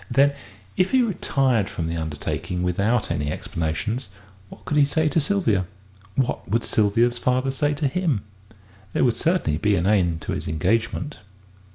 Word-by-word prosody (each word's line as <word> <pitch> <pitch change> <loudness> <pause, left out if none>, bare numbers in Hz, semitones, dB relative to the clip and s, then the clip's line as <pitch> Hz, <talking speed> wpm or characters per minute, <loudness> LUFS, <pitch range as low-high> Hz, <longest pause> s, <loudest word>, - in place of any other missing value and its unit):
Then, 140 +3 +4 0.4
if 185 +1 +3
he 260 -1 +4
retired 135 - +1
from 80 - -4
the 85 +1 -2
undertaking 80 +3 -3
without 100 +5 +1
any 75 -4 -1
explanations, 85 +13 -3 0.4
what - - -14
could 150 - 0
he 145 - +7
say 155 +2 +1
to 150 +2 +2
Sylvia? 140 - +1 0.5
What 130 -2 -1
would 115 +2 +1
Sylvia's 115 +3 +2
father 130 +1 +1
say 145 +2 0
to 145 0 0
him? 145 - 0 0.7
There - - +2
would 120 - +4
certainly 160 - +1
be 105 +2 +2
an 85 -1 0
end 90 -6 +2
to - - -4
his - - -3
engagement. 110 - -1
115 Hz, 165 wpm, -23 LUFS, 90-145 Hz, 0.7 s, he